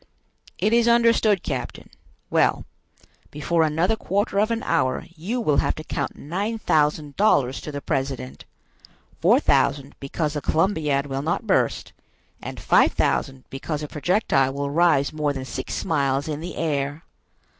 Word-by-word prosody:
"It 215 - +1
is 235 0 +4
understood, 230 -4 +4
captain. - - -5 0.4
Well, - - +2 0.6
before 165 +3 0
another 160 +7 +2
quarter 200 0 -1
of 215 +2 +2
an 230 0 -2
hour 130 +4 0
you 200 +10 -3
will 150 -11 +1
have - - +1
to 155 - -7
count - - -3
nine 200 +9 -3
thousand 150 -6 +1
dollars 135 -11 +2
to 150 - -6
the 145 -1 -5
president; 135 - -3 0.7
four - - +5
thousand 140 -1 +1
because 150 +2 -3
the 150 - -3
Columbiad 155 -5 +1
will 135 -1 -3
not 160 +4 -2
burst, - - 0 0.5
and - - -7
five - - +4
thousand 130 -1 -1
because 150 +3 -4
the 150 - -4
projectile 150 -5 +1
will 140 0 -2
rise 155 -3 +3
more 150 -2 -1
than 135 -1 -5
six - - -5
miles 140 -4 0
in 150 -1 -3
the 170 +1 -6
air." 145 -1 -2
150 Hz, 155 wpm, -23 LUFS, 140-185 Hz, 0.7 s, four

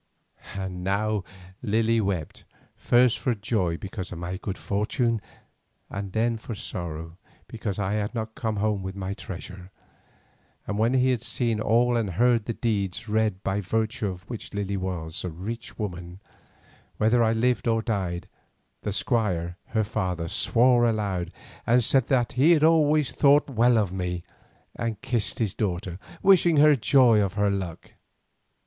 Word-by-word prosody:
And 95 -2 -5
now 100 +1 0 0.4
Lily 115 +2 +2
wept, 95 -7 -3 0.3
first 120 0 +3
for 125 -3 0
joy 100 -5 -1
because 95 0 -6
of 90 - -6
my 90 +2 -4
good 100 0 -5
fortune, 115 +3 0 0.7
and 100 -1 -5
then 115 +1 +1
for 115 0 -7
sorrow 80 -2 -6 0.3
because 110 -4 -4
I 100 -1 -1
had 105 +2 -2
not 110 -1 -3
come 105 -3 -1
with 95 0 -5
my 95 0 -3
treasure, 95 -2 -8 1.0
and 105 0 -3
when 115 +4 +2
he 130 0 +3
had 120 -3 -1
seen 115 -2 -1
all 120 +3 +3
and 115 -4 0
heard 120 +2 +3
the 115 - -2
deeds 105 -2 -2
read 105 -3 0
by 100 +1 -1
virtue 110 +2 -1
of 95 +1 -7
which 115 -3 -7
Lily 100 -1 -2
was 90 -3 -4
a 90 - -2
rich 105 +8 -7
woman 90 -3 -5 0.8
whether 115 +2 +3
I 110 0 +3
lived 120 0 +1
or 115 -1 +2
died, 95 -6 -2 0.5
the 105 - -3
Squire 90 -7 0
her 110 -2 0
father 90 -5 -2
swore 120 +7 +3
aloud 100 -6 -2 0.4
and 120 +1 +4
said 130 +1 +3
that 125 -4 +2
he 140 +7 +5
had 155 -2 +3
always 155 -3 +4
thought 145 0 +4
well 120 0 +4
of 100 -5 +1
me, 90 -2 -3 0.5
and 115 -2 -3
kissed 120 -6 -1
his 110 -5 -1
daughter, 90 -3 -3 0.2
wishing 180 -4 +5
her 150 0 +7
joy 120 -3 +5
of 100 -1 -1
her 100 -1 +2
luck. 95 -4 -5
105 Hz, 155 wpm, -26 LUFS, 95-120 Hz, 1.0 s, her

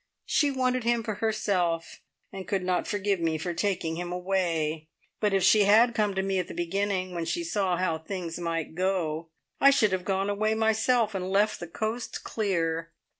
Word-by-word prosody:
She 290 - +2
wanted 255 -2 0
him 235 0 +1
for 215 - -2
herself, 195 -6 -1 0.3
and 190 -2 -7
could 195 -2 -1
not 180 -1 0
forgive 200 -2 0
me 165 -1 0
for 175 +3 -3
taking 170 -3 -1
him 175 0 -4
away; 170 -4 -1 0.3
but 210 -1 +1
if 195 -1 +2
she 210 -2 +6
had 225 +4 +5
come 210 -3 0
to 190 - 0
me 195 -1 0
at 180 - -2
the - - -8
beginning, 185 +1 -1
when 170 -1 -3
she 340 - -2
saw 195 - 0
how 165 -3 0
things 170 0 -5
might 165 -2 -3
go, 165 -3 -1 0.3
I 275 - +7
should 220 -7 +3
have 185 -1 -1
gone 195 +1 0
away 215 +2 0
myself 220 +1 +2
and 185 -1 -3
left 205 +2 +2
the 175 - -6
coast 220 +7 -4
clear. 165 -6 -1
190 Hz, 190 wpm, -27 LUFS, 170-215 Hz, 0.3 s, I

